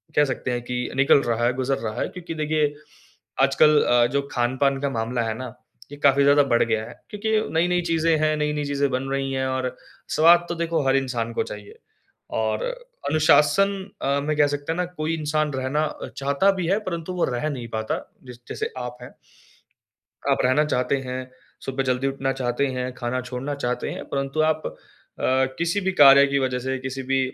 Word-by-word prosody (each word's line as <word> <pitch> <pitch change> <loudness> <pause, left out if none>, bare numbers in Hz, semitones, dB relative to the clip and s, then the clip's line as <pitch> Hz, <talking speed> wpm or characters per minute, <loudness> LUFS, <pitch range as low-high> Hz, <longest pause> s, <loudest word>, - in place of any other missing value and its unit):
कह 150 - +5
सकते 130 -1 -3
हैं 120 0 -2
कि 125 0 -3
निकल 140 +1 +5
रहा 120 0 0
है, 125 - +2
गुजर 130 +1 -1
रहा 110 -1 -4
है, - - 0
क्योंकि 175 -2 -7
देखिए, 150 -1 0 0.7
आजकल 145 +2 +5
अ, 120 -1 +4
जो 140 - +2
खान-पान 130 +3 +1
का 140 - 0
मामला 120 -1 -2
है 110 -1 -2
ना, 130 -3 -7 0.4
ये 145 - -8
काफ़ी 140 0 +5
ज़्यादा 145 +1 +5
बढ़ 120 - +4
गया 110 -1 -1
है। - - -10 0.2
क्योंकि 215 +1 -3 0.2
नई-नई 175 +2 +2
चीज़ें 165 0 +2
हैं, 155 0 +2
नई-नई 150 0 -1
चीज़ें 140 0 0
बन 130 +1 -2
रही 135 0 -1
हैं 130 0 -1
और 130 -1 -2 0.4
स्वाद 170 +2 +6
तो 170 - -2
देखो 165 -1 -1
हर 135 - +4
इंसान 120 -4 -1
को - - 0
चाहिए, 105 -1 -10 0.5
और 110 -1 -1 0.5
अनुशासन 155 +5 +4 0.3
अ, 140 +1 +1
में 155 +1 -1
कह 145 -1 +5
सकते 145 +2 -3
हैं - - -6
ना 180 - 0
कोई 165 -2 -3
इंसान 155 -1 -1
रहना 135 +4 0 0.3
चाहता 140 +8 +2
भी 165 - -2
है 195 +4 +2
परंतु 170 +1 -4
वो 180 - +1
रह 150 +6 -1
नहीं 125 -5 -5
पाता 110 0 -2 0.3
जस 125 -1 -11
जैसे - - -3
आप 125 -1 -5
है। - - -11 1.2
आप - - +3
रहना 130 +4 +3
चाहते 140 -1 0
हैं, 130 0 -5 0.3
सुबह 135 0 -2
जल्दी 130 +1 0
उठना 135 0 -1
चाहते 125 +1 -1
हैं, 125 -1 -3
खाना 120 +1 -2
छोड़ना 125 +3 -5
चाहते 125 0 -1
हैं - - -6
परंतु 140 +2 -1
आप 155 0 +1
अ, - - -11 0.3
किसी 170 +4 0
भी 190 0 0
कार्य 140 -4 +8
की 140 0 +1
वज़ह 130 -1 -1
से 130 +1 -2
किसी 130 0 -5
भी 135 0 +2
135 Hz, 200 wpm, -23 LUFS, 125-155 Hz, 1.2 s, कार्य